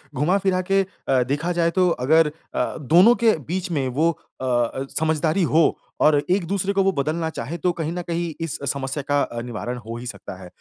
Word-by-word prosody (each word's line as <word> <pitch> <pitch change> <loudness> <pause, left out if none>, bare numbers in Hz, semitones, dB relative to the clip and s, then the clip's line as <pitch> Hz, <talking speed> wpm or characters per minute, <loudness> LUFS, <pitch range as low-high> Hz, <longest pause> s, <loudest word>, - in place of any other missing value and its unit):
घुमा-फिरा 185 +5 +1
के 195 0 +5 0.3
अ, 130 -2 +3
देखा 150 +7 -1
जाए 170 -1 +1
तो 180 -1 +4
अगर 160 +3 +3 0.3
अ, - - -1
दोनों 175 - +5
के 220 -7 +5
बीच 180 +1 -3
में 140 -5 0
वो 155 +7 +2 0.3
अ - - -2
अ, 125 +2 0
समझदारी 160 +3 +1
हो 160 0 +3 0.2
और 150 -1 +5
एक-दूसरे 195 +1 0
को 195 -1 +2
वो 195 - +3
बदलना 160 +3 -1
चाहें, 155 +4 -5
तो 180 +3 +1
कहीं 160 0 -1
न 180 - -3
कहीं 170 -1 -2
इस 165 -3 -3
समस्या 140 +1 -4
का 145 0 +2
अ, 120 0 -3
निवारण 120 +1 -5
हो 115 +1 -6
ही 120 - -8
सकता 95 - -8
है। 90 - -9
160 Hz, 205 wpm, -23 LUFS, 135-175 Hz, 0.3 s, के